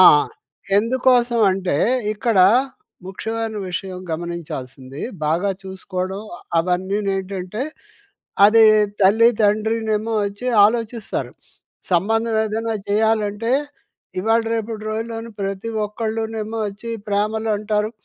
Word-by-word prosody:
ఆ! - - +10 0.8
ఎందుకోసవంటే, 230 - +2 0.4
ఇక్కడా 215 -3 +3 0.6
ముఖ్యమైన 225 +3 -4
విషయం 185 +1 -4
గమనించాల్సింది, 145 -6 -6 0.3
బాగా 170 +6 +1
చూసుకోవడం, 190 0 -5 0.2
అ - - -16 0.2
అవన్నీనేంటంటే, 190 +3 -1 0.8
అదీ 225 +2 +6 0.4
తల్లి, 220 +5 +6
తండ్రినేమో 220 +1 +1
ఒచ్చి 205 +5 -6 0.2
ఆలోచిస్తారు. 230 0 -3 0.6
సంబంధం 225 +5 +2
ఏదైనా 225 +1 -2
చెయ్యాలంటే, 215 +1 +1 0.7
ఇవాళ, 225 +3 +2
రేపుటి 220 -1 -4
రోజుల్లోను 225 +1 -4
ప్రతి 195 +3 -3 0.2
ఒక్కళ్ళునేమో 220 0 -3
ఒచ్చి 210 +4 -8 0.2
ప్రేమలు 215 +2 0
అంటారు. 210 0 -1
215 Hz, 85 wpm, -21 LUFS, 190-225 Hz, 0.8 s, ఆ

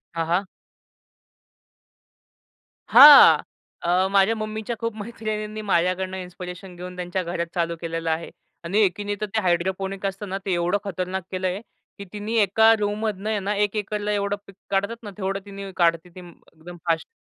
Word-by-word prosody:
हां, 165 0 -1
हां. 180 +4 0 2.4
हां, 290 -1 +10 0.4
अ, 180 +2 +2
माझ्या 200 +3 +4
मम्मीच्या 215 +1 -4
खूप 230 -2 -3
मैत्रिणींनी 215 -1 -5
माझ्याकडनं 185 -1 0
इन्स्पिरेशन 180 0 -9
घेऊन 180 +1 -8
त्यांच्या 180 +1 -3
घरात 170 0 -3
चालू 170 -1 -1
केलेलं 165 -1 -3
आहे 160 +1 -2 0.3
आणि 185 +5 0
एकीने 205 +1 0
तर - - 0
ते 220 - +2
हायड्रोपोनिक 190 +2 -1
असत 195 +1 -3
ना, 190 0 -3
ते 190 - 0
एवढं 175 +3 +1
खतरनाक 185 -1 -4
केलंय, 185 0 -2 0.4
की 200 - -8
तिनी 210 +2 -4
एका 220 +3 +5
रूममधनं 210 0 -2
ना, 205 +2 -1
1 205 +1 0
एकरला 210 0 -2
एवढं 200 -1 0
पीक 195 - -14
काढतात 200 +4 -1
ना, 210 - -7
तेवढं 195 0 -2
तिनी 200 -1 -8
काढते 170 0 +2
ती, 175 - -13
एकदम 175 -1 -14
फास्ट. 165 -1 0
195 Hz, 155 wpm, -23 LUFS, 180-210 Hz, 2.4 s, हां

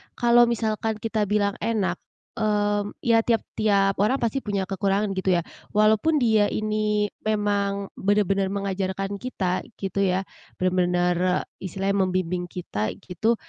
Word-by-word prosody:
kalau 240 0 +5
misalkan 220 -1 -1
kita 220 -2 0
bilang 205 -1 +1
enak 195 -6 -1 0.4
mmm, 205 -1 0
ya, 230 -2 +4
tiap 230 -1 +2 0.2
tiap 200 -2 +2
orang 210 +6 +3
pasti 235 +4 0
punya 200 -5 -2
kekurangan 195 +1 0
gitu 185 -1 +2
ya, 170 - 0 0.3
walaupun 215 +9 +4
dia 220 -7 +3
ini 215 -1 0 0.2
memang 200 -2 0
benar-benar 200 -1 +2
mengajarkan 195 0 -3
kita, 190 -7 -2
gitu 195 0 -4
ya, 190 -1 +2 0.3
benar-benar 180 0 +1 0.2
istilahnya 195 +1 0
membimbing 180 -1 -1
kita, 110 - -4
gitu, 220 +6 0
200 Hz, 130 wpm, -24 LUFS, 190-215 Hz, 0.4 s, kalau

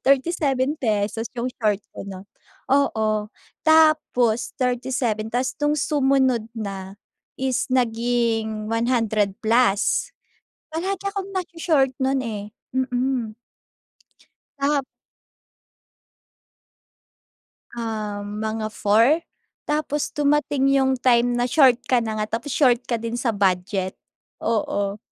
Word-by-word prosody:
37 275 0 +2
pesos 220 -1 -1
yung 245 +1 -2
short 210 -3 +1 0.2
ko, - - -6
'no. 195 0 -9 0.4
Oo. 220 -6 +1 0.3
Tapos 310 -7 +3
37, 245 -3 -1
ta's 250 +2 -1
nung 295 - +3
sumunod 270 -5 +2
na 195 -3 -6 0.4
is 265 -1 0
naging 230 -3 0
100 225 -4 +1
plus. 225 -2 +2 0.6
Palagi 380 +4 -3
akong 395 -1 -5
naso-short 330 -7 +1
nun 265 +1 +1
eh. 210 -3 -5 0.2
Mm. 250 -3 -1 1.2
Tap 280 0 +1 2.9
Ah, 215 -3 -4
mga 215 +1 -3
4? 230 +11 +3 0.5
Tapos 295 -1 -1
dumating 290 -1 +1
yung 265 -1 +2
time 245 -1 +3
na-short 250 0 +4
ka 250 -2 +3
na 220 -1 -3
nga, 210 - -1
tapos 290 +4 -8
short 250 -3 +3
ka 235 -2 -2
din 230 +1 -4
sa 240 0 0
budget, 190 -2 0 0.5
oo. 205 -2 -1
240 Hz, 100 wpm, -23 LUFS, 215-270 Hz, 2.9 s, na-short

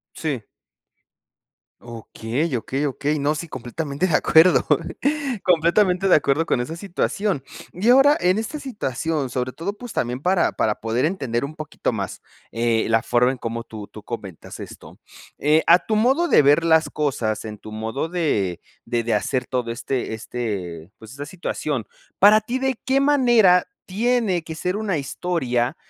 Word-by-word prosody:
Sí. 140 -9 -3 1.4
Okey, 120 +5 -4
okey, 135 +5 -2
okey. 145 +2 -1
No, 145 +2 +1
sí, 165 +2 -6
completamente 140 +6 -3
de 165 - -1
acuerdo. 160 +5 +5 0.8
Completamente 180 +2 +3
de - - +6
acuerdo 150 +2 +2
con 120 - +1
esa 155 +7 -4
situación. 195 -2 -2 0.3
Y 195 +6 -1
ahora, 275 +4 +6
en 180 +3 +2
esta 285 +7 -4
situación, 160 - -3
sobre 125 +1 -3
todo, 180 +8 -4
pues, 245 0 -9
también 125 +2 -2
para 180 -1 +2
para 105 -1 0
poder 115 +3 -1
entender 140 -8 -1
un 155 +3 -7
poquito 155 -1 -3
más, - - -5 0.3
eh, 115 -1 +1
la 115 0 +3
forma 125 +1 +2
en 130 - -8
cómo 115 0 -4
tú 105 -2 -9
tú 110 - -12
comentas 100 -8 -8
esto. - - -11 0.4
Eh, 155 +2 +3
a 175 +2 +6
tu 215 - 0
modo 270 +10 +3
de - - +6
ver 145 +4 +4
las 160 -1 +4
cosas, 120 -8 -1
en 105 -1 -7
tu 110 - -11
modo 110 +8 -3
de 125 - -1 0.2
de 120 -1 -1
de 115 - 0
hacer 125 -1 -1
todo 125 -2 -2
este 120 -1 -3
este, 100 -8 -5
pues, 110 -1 -13
esta 140 +2 -7
situación, 150 - -3 0.3
¿para 210 +2 +7
ti 240 +5 -3
de 265 -3 -1
qué 270 +1 +3
manera 240 -10 +4 0.2
tiene 215 -3 0
que 160 -1 -7
ser 180 +4 -2
una 210 -5 -1
historia 135 -3 -1
150 Hz, 165 wpm, -22 LUFS, 120-185 Hz, 1.4 s, para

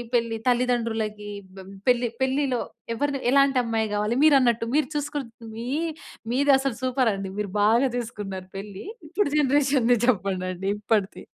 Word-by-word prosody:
పెళ్లి 230 -1 0
తల్లిదండ్రులకి 225 -4 0 0.3
బ 190 0 -10 0.2
పెళ్లి 245 -1 +3
పెళ్లిలో 265 -2 0 0.3
ఎవరిని 285 +1 -1
ఎలాంటి 275 -1 +4
అమ్మాయి 225 -1 0
గావాలి 210 +3 0
మీరు 300 -3 +7
అన్నట్టు. 235 -2 +2
మీరు 305 - +2
చూసకుంటే 290 -5 -3 0.2
మీ 235 +2 -5 0.6
మీది 280 +3 +3
అసలు 270 -3 -2
సూపర్ 255 -2 +2
అండి. 195 0 -4
మీరు 210 -2 -2
బాగా 235 +5 +4
చేసుకున్నారు 200 -6 -5
పెళ్లి. 200 -1 -7 0.2
ఇప్పుడు 370 +2 0
జనరేషన్‌‌ది 270 -3 +3
చెప్పండండి. 190 -4 -1
ఇప్పడిది. 210 -2 0
235 Hz, 135 wpm, -25 LUFS, 210-270 Hz, 0.6 s, మీరు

